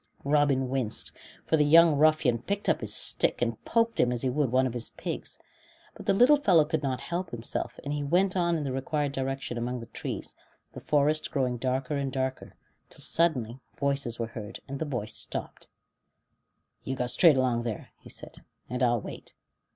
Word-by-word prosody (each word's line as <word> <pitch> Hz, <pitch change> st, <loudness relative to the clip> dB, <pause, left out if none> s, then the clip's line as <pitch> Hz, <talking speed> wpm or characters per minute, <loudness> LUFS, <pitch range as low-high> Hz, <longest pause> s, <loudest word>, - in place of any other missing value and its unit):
Robin 140 Hz, -2 st, +2 dB
winced, 125 Hz, -4 st, -2 dB, 0.3 s
for 160 Hz, -, +2 dB
the 150 Hz, -, +4 dB
young 165 Hz, +1 st, +6 dB
ruffian 150 Hz, -5 st, +3 dB
picked 200 Hz, -, -3 dB
up -, -, +2 dB
his -, -, -2 dB
stick -, -, +3 dB
and -, -, -2 dB
poked 230 Hz, 0 st, +1 dB
him 125 Hz, -, +3 dB
as 120 Hz, 0 st, -2 dB
he 130 Hz, -, +1 dB
would 140 Hz, -2 st, 0 dB
one 130 Hz, +1 st, +3 dB
of 125 Hz, -, -2 dB
his 120 Hz, -2 st, -4 dB
pigs. -, -, -4 dB, 0.6 s
But -, -, -12 dB
the -, -, +4 dB
little 255 Hz, +8 st, +6 dB
fellow 180 Hz, -, +4 dB
could 160 Hz, -1 st, -1 dB
not 130 Hz, -3 st, -2 dB
help 175 Hz, 0 st, -4 dB
himself, 120 Hz, -1 st, -4 dB
and 145 Hz, -, -3 dB
he 150 Hz, -, -2 dB
went 185 Hz, +6 st, +2 dB
on 170 Hz, -2 st, +2 dB
in 155 Hz, -, -3 dB
the 135 Hz, -, -3 dB
required 140 Hz, +2 st, -1 dB
direction 135 Hz, -3 st, -3 dB
among 125 Hz, +1 st, -3 dB
the 115 Hz, -, -8 dB
trees, -, -, -6 dB, 0.4 s
the -, -, -7 dB
forest 150 Hz, +1 st, +1 dB
growing 125 Hz, -3 st, -1 dB
darker 130 Hz, +3 st, -1 dB
and 140 Hz, -1 st, -2 dB
darker, 130 Hz, 0 st, -3 dB, 0.3 s
till -, -, -15 dB
suddenly 135 Hz, -8 st, +1 dB, 0.2 s
voices 140 Hz, -3 st, -1 dB
were 115 Hz, -, -2 dB
heard, 110 Hz, -2 st, -8 dB
and 140 Hz, 0 st, -5 dB
the 160 Hz, -, -1 dB
boy 125 Hz, -8 st, -3 dB
stopped, 110 Hz, -, -6 dB, 1.2 s
"You 130 Hz, -, -3 dB
go 125 Hz, -, -1 dB
straight 145 Hz, +4 st, +5 dB
along 125 Hz, -2 st, +1 dB
there," 115 Hz, -3 st, -5 dB
he -, -, -14 dB
said, -, -, -9 dB, 0.3 s
"and 125 Hz, +2 st, -4 dB
I'll 120 Hz, -3 st, +2 dB
wait." -, -, -9 dB
135 Hz, 195 wpm, -28 LUFS, 125-155 Hz, 1.2 s, young